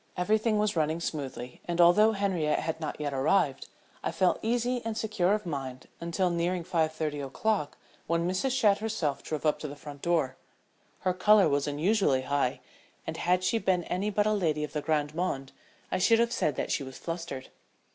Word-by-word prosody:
Everything 215 +4 +2
was 210 -1 +1
running 160 0 +1
smoothly, 135 -6 -5
and, 175 0 -3
although 210 +6 +6
Henriette 190 -7 0
had 160 0 -3
not 155 - -4
yet 145 -2 -2
arrived, 140 +1 +1 0.4
I - - -1
felt 185 - +2
easy 240 +2 0
and 225 -1 -3
secure 210 -4 +1
of 210 - -5
mind 135 -5 -5
until 170 +2 0
nearing 170 +1 0
five 165 -3 +1
thirty 155 -2 -3
o'clock 150 +4 -1 0.3
when 170 +1 +1
Mrs. 185 +9 0
Shadd 210 -6 +4
herself 180 -10 -2
drove 155 -1 -4
up 150 - +2
to 150 - -4
the 145 - -7
front 145 -2 -10
door. 160 -7 0 0.6
Her 185 -1 +1
color 205 +1 +5
was 145 -1 +1
unusually 145 -2 +2
high, 140 -2 0 0.4
and - - -4
had 180 +1 +1
she 225 +4 +2
been 185 -4 +1
any 190 +5 -1
but 205 0 +1
a 215 - +2
lady 160 -7 0
of 150 - -5
the 150 - -1
grande 150 -1 0
monde 140 -6 -2 0.4
I - - 0
should 230 +5 +5
have 235 +1 +2
said 150 -3 0
that - - -2
she - - +1
was 130 -1 -8
flustered. 165 -6 -5
170 Hz, 195 wpm, -29 LUFS, 150-200 Hz, 0.6 s, although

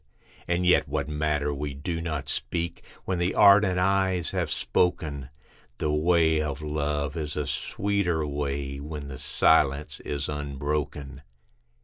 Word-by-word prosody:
And 90 +1 0
yet 90 - +4
what - - -2
matter 75 -1 0
we 70 0 -4
do 80 +4 -3
not 75 -4 -3
speak, 85 -1 -3 0.2
when 95 -2 -1
the 90 +1 0
ardent 100 -2 +6
eyes 95 -2 +1
have - - -1
spoken, 70 -6 0 0.5
The 75 - -1
way 80 0 +3
of 75 -1 -4
love 75 -1 -2
is 75 -2 -3
a 75 - -1
sweeter 90 0 -1
way, 70 -1 -3
when 75 -1 -6
the 65 -2 -7
silence 75 -1 +2
is 70 -1 -3
unbroken. 70 -1 -3
75 Hz, 135 wpm, -26 LUFS, 70-85 Hz, 0.5 s, ardent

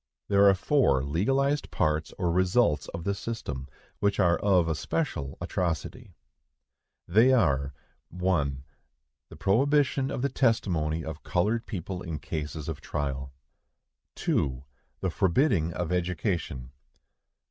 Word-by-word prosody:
There 100 0 +6
are 95 - +5
four 95 - +2
legalized 135 - +1
parts 75 0 0
or 90 -2 0
results 90 - +2
of 85 0 -6
the 100 +2 0
system, 75 - -5 0.3
which 100 0 +1
are 85 -3 +4
of 95 -5 +3
especial 80 - -2
atrocity. 85 -4 -3 0.9
They 110 +9 +5
are,— 70 - +2 0.4
1. 80 -7 -1 0.7
The - - -11
prohibition 135 +5 +2
of 125 - -3
the 140 - +2
testimony 85 - +1
of 80 0 -6
colored 105 +6 0
people 90 -2 -5
in 80 -4 -4
cases 75 +1 -5
of 80 -3 -5
trial. 65 -2 -3 0.8
2. 65 -2 -1 0.4
The 95 - 0
forbidding 90 - +2
of 90 +1 -3
education. 85 - -2
90 Hz, 120 wpm, -28 LUFS, 75-105 Hz, 0.9 s, There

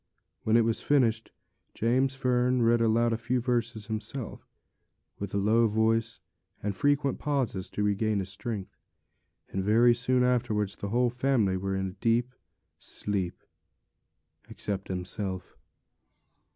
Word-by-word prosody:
When 110 +1 +3
it 115 - +4
was 115 -1 0
finished, 115 -6 +2 0.4
James 130 +4 +1
Fern 125 -1 +2
read 115 0 +4
a 115 0 +2
few 120 +2 -1
verses 120 -2 -1
aloud 110 - -9
himself, 110 +3 -5 0.7
with 100 -1 -4
low 110 +4 +3
voice 110 +1 +1 0.4
and 100 -1 -1
frequent 145 +3 +1
pauses 130 -11 -1
to 105 - -2
regain 105 +1 +1
his 95 -1 -3
strength; 105 -2 -5 0.7
and 95 - -2
very 115 +4 +5
soon 125 +1 +1
afterwards 110 -5 +1
the 100 - -5
whole 120 +2 +2
family 125 -6 +1
were 95 +1 -2
in 95 0 -1
a 95 +1 -15
deep 120 +2 +1 0.5
sleep, 95 -4 -4 1.1
except 100 -1 -4
himself. 95 0 -4
115 Hz, 130 wpm, -28 LUFS, 100-125 Hz, 1.1 s, very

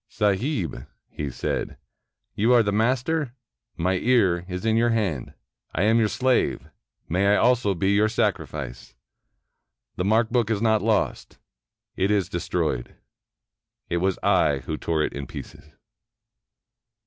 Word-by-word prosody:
"Sahib," 100 - -1 0.2
he 75 -2 -4
said, - - -3 0.6
"you 115 +5 +2
are 120 -2 +6
the 100 - 0
master; 125 +5 0 0.4
my 90 +3 +1
ear 95 -8 +2
is 90 +2 -5
in 110 0 +2
your 120 +1 +3
hand; 100 - -1 0.4
I 90 - +1
am 110 +2 +4
your 110 - +3
slave; 130 +3 0 0.4
may 95 +4 +1
I 100 - +5
be - - +3
also 115 -7 +2
your 100 +2 +3
sacrifice! 65 - -3 1.0
The 90 - -1
mark 110 +2 +2
book 120 -3 +1
is 110 -3 0
not 110 -1 +2
lost; 110 -2 -1 0.6
it 95 +1 +1
is 100 -4 +1
destroyed. - - -2 0.9
It 85 - 0
was 95 +1 0
I 90 -8 +2
who 80 - -3
tore 80 0 -1
it - - -2
in 70 -2 -6
pieces." - - -10
100 Hz, 140 wpm, -24 LUFS, 90-115 Hz, 1.0 s, are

